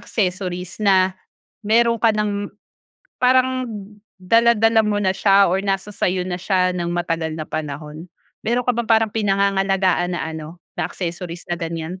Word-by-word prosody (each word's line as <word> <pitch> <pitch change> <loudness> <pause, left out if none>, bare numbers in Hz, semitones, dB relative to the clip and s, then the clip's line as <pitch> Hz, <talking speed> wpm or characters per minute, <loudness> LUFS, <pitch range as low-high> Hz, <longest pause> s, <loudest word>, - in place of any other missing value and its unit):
accessories 180 -3 -3
na 190 -2 +4 0.5
meron 230 +2 +3
ka 230 - +5
ng 205 -1 -2 0.7
parang 255 0 +3 0.5
dala-dala 225 +3 +4
mo 210 -1 0
na 190 -1 +2
siya 195 0 +4
or 190 +2 +1
nasa 195 +1 -2
sa - - 0
'yo 185 0 -1
na 180 -1 -3
siya 185 -1 +1
ng 170 -1 -2
matagal 165 -2 -2
na 155 - -4
panahon? 150 +2 -6 0.4
Meron 240 +2 0
ka 250 - +3
bang 235 -1 -2
parang 225 -1 +3
pinangangalagaan 195 -3 +1
na - - -3
ano, 160 +2 -8 0.2
na - - 0
accessories 175 -1 -6
na 175 - 0
ganyan? 165 +2 -5
190 Hz, 155 wpm, -21 LUFS, 175-215 Hz, 0.7 s, ka